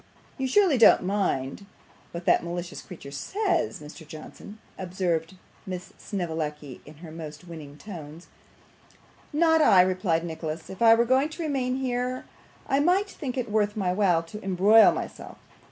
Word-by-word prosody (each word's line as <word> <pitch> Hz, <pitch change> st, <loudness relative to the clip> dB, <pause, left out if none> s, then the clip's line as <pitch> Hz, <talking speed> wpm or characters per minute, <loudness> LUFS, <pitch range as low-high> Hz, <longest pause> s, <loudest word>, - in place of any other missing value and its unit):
'You 265 Hz, -, 0 dB
surely 335 Hz, -2 st, +3 dB
don't 225 Hz, -, +7 dB
mind 190 Hz, -4 st, -2 dB, 0.4 s
what 170 Hz, +1 st, -7 dB
that 180 Hz, -, +4 dB
malicious 175 Hz, +1 st, -5 dB
creature 160 Hz, -6 st, -11 dB
says, 370 Hz, -, -1 dB
Mr. 150 Hz, +1 st, -12 dB
Johnson?' 160 Hz, +7 st, -11 dB, 0.2 s
observed 180 Hz, -2 st, -2 dB, 0.3 s
Miss 180 Hz, -1 st, -6 dB
Snevellicci 155 Hz, -, -4 dB
in 150 Hz, -, -12 dB
her 160 Hz, -, -9 dB
most 160 Hz, +1 st, -9 dB
winning 150 Hz, -4 st, -10 dB
tones. 165 Hz, -4 st, -10 dB, 1.1 s
'Not 320 Hz, +1 st, +3 dB
I,' 185 Hz, -11 st, +7 dB
replied 185 Hz, -3 st, 0 dB
Nicholas. 160 Hz, -1 st, -6 dB
'If 190 Hz, -, -10 dB
I 225 Hz, -1 st, +8 dB
were 235 Hz, +1 st, +2 dB
going 260 Hz, +4 st, +2 dB
to 325 Hz, +2 st, -6 dB
remain 260 Hz, -4 st, -1 dB
here, 255 Hz, -1 st, -2 dB, 0.4 s
I 270 Hz, -, +1 dB
might 365 Hz, +7 st, +2 dB
think 265 Hz, -3 st, -5 dB
it 240 Hz, -4 st, -3 dB
worth 210 Hz, 0 st, +1 dB
my 185 Hz, -3 st, 0 dB
while 180 Hz, -4 st, +2 dB
to 210 Hz, +6 st, -10 dB
embroil 195 Hz, +4 st, +6 dB
myself. -, -, -7 dB
185 Hz, 155 wpm, -26 LUFS, 165-250 Hz, 1.1 s, I